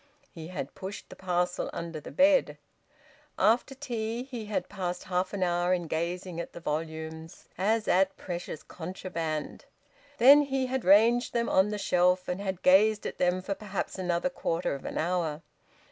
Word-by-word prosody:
He 160 -2 -9
had 155 -6 -5
pushed 195 +2 -8
the - - -10
parcel 180 -1 -1
under 170 -2 -5
the - - -10
bed. 285 0 +3 0.8
After 240 +4 +2
tea, 235 -3 -3
he 245 -5 -7
had 210 - -2
passed 180 -3 -4
half 185 0 -1
an 200 -2 -1
hour 175 +1 +2
in 175 -1 -4
gazing 170 +2 -3
at 170 - -6
the - - -8
volumes, 160 +1 -5
as 215 +4 +1
at 190 +1 +3
precious 175 -3 -6
contraband. 165 -3 -5 0.5
Then 275 +5 +8
he 270 -2 -1
had 260 0 -2
ranged 230 +6 +5
them 235 -1 0
on 190 +2 +4
the 210 - -2
shelf, 180 -1 +2
and 180 +2 -2
had 190 -2 -4
gazed 210 +3 +5
at - - -5
them 180 +1 +1
for 195 - -2
perhaps 200 -1 -5
another 180 +7 0
quarter 170 - -1
of 140 - -7
an - - -4
hour. 165 -2 -1
185 Hz, 170 wpm, -29 LUFS, 170-215 Hz, 0.8 s, Then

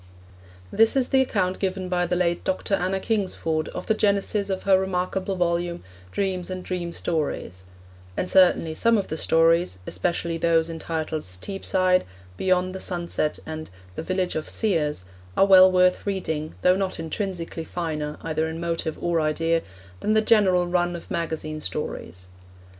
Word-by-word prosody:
This 225 +3 +4
is 260 -2 +2
the 265 - +4
account 190 -7 0
given 190 -1 -2
by 180 -1 0
the - - 0
late 175 -1 0
Dr. 190 +1 -2
Anna 190 0 +1
Kingsford 185 -7 -1
of 180 - -6
the - - +2
genesis 200 -1 +1
of 190 -1 -2
her 190 -1 +5
remarkable 190 +1 -1
volume, 175 -1 -1 0.3
Dreams 185 - -2
and 185 0 -5
Dream 175 -2 -3
Stories; 145 - -3 0.5
and - - -1
certainly 180 -4 +4
some 230 +7 +3
of 200 - -2
the 160 - -2
stories, 165 - +3
especially 170 -1 -1
those 165 0 +2
entitled 160 -1 -3
Steepside, 185 - 0 0.3
Beyond 185 - +1
the 190 - -5
Sunset, 170 -4 -1
and 155 0 -6 0.2
The - - -5
Village 185 +1 -1
of 155 - -4
Seers, 150 - 0 0.3
are - - +6
well 185 -1 +8
worth 180 +1 +3
reading, 160 -6 -2
though 180 0 +5
not 190 -2 -2
intrinsically 165 0 -4
finer, 155 -3 -4
either 160 0 -1
in 160 0 -5
motive 165 -2 -2
or 170 -1 +1
idea, 165 +2 +1 0.4
than 215 - +1
the 215 - +5
general 190 -6 +4
run 175 0 0
of 170 - -10
magazine 155 -2 -3
stories. 90 - -5
175 Hz, 160 wpm, -24 LUFS, 160-190 Hz, 0.5 s, well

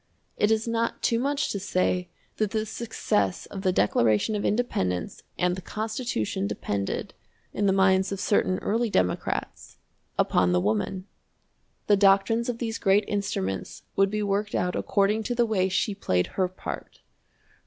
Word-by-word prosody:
It 210 - +2
is 220 +1 +1
not 230 0 -1
too 230 - +2
much 280 +3 0
to 200 - -2
say 185 -2 0 0.3
that 215 -2 +1
the 215 +1 -1
success 105 - -1
of 195 - -7
the 190 -1 +2
Declaration 110 - +2
of 205 - -2
Independence 95 - -1 0.2
and 180 0 +1
the 185 - -7
Constitution 215 - -2
depended, 100 -1 -3 0.4
in 205 - +1
the - - +4
minds 190 0 +3
of 195 - -3
certain 185 -2 +2
early 230 +2 +1
Democrats, 90 - -2 0.4
upon 90 0 +3
the 90 - +3
woman. 105 - -1 0.8
The 205 - +4
doctrines 200 +4 +4
of 240 - -2
these 230 -2 -3
great 200 0 +3
instruments 200 - -3
would 195 0 +4
be 210 +1 -1
worked 205 +1 -1
out 180 0 0
according 205 +2 +1
to 245 - -1
the 240 0 +3
way 190 -4 +1
she 195 +3 0
played 90 - 0
her 185 -1 +1
part. 185 - -8
195 Hz, 160 wpm, -26 LUFS, 180-220 Hz, 0.8 s, the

